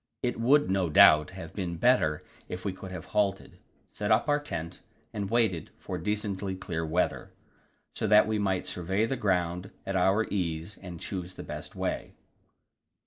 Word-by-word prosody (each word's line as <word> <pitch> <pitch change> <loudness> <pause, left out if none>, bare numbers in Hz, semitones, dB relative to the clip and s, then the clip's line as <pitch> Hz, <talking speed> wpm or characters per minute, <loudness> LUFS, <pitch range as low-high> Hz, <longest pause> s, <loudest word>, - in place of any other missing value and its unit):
It 120 -2 -1
would, 140 +6 +4
no 95 -3 +1
doubt, 75 0 +7
have 80 -3 -8
been 90 -4 -3
better 85 -8 +3 0.3
if 90 +2 -6
we 100 - -1
could 95 0 -9
have 90 -3 -7
halted, 100 -2 0 0.3
set 105 -1 -3
up 110 +6 +3
our 145 0 +3
tent, 85 - -6 0.3
and 100 -2 -3
waited 110 -8 +1
for - - -5
decently 105 -2 -2
clear 85 -3 -4
weather, 80 +3 -1 0.6
so - - -2
that 105 +1 +7
we 110 -1 0
might 95 -3 0
survey 95 +3 0
the 135 - -1
ground 90 -4 0 0.2
at 95 - -3
our 95 +4 +3
ease 85 -1 -2
and 90 -3 -8
choose 90 0 -5
the - - -7
best - - -7
way. - - -3
95 Hz, 170 wpm, -29 LUFS, 90-105 Hz, 0.6 s, doubt